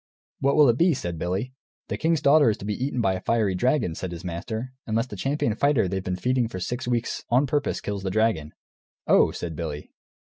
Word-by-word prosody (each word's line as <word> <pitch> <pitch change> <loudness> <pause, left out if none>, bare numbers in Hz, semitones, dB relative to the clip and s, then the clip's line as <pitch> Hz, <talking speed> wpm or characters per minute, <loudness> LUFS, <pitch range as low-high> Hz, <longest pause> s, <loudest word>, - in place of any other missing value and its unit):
"What 140 +1 +2
will 150 -2 +7
it 120 0 +2
be?" 170 -2 +4
said 85 -7 -4
Billy. 95 +10 -2 0.3
"The - - -2
king's 165 -1 0
daughter 145 -2 +6
is 105 - 0
to - - -8
be 105 - -1
eaten 130 -3 -1
by 95 -3 +2
a 95 - -4
fiery 110 -4 +1
dragon," 125 - +1
said 90 +2 -5
his 85 -1 -7
master, 110 +8 -5
"unless 115 +2 +1
the 120 - -9
champion 135 +1 0
fighter 135 -3 +2
they've 95 +1 -3
been 90 -1 -2
feeding 125 +5 +1
for 95 -5 -6
six 120 +7 -4
weeks 120 -2 -1
on 125 +4 +4
purpose 145 +1 -1
kills 100 -1 -4
the 95 - -2
dragon." 95 -7 0 0.5
"Oh," - - +5
said 85 -2 -5
Billy. 75 -2 -5
110 Hz, 220 wpm, -25 LUFS, 95-130 Hz, 0.5 s, will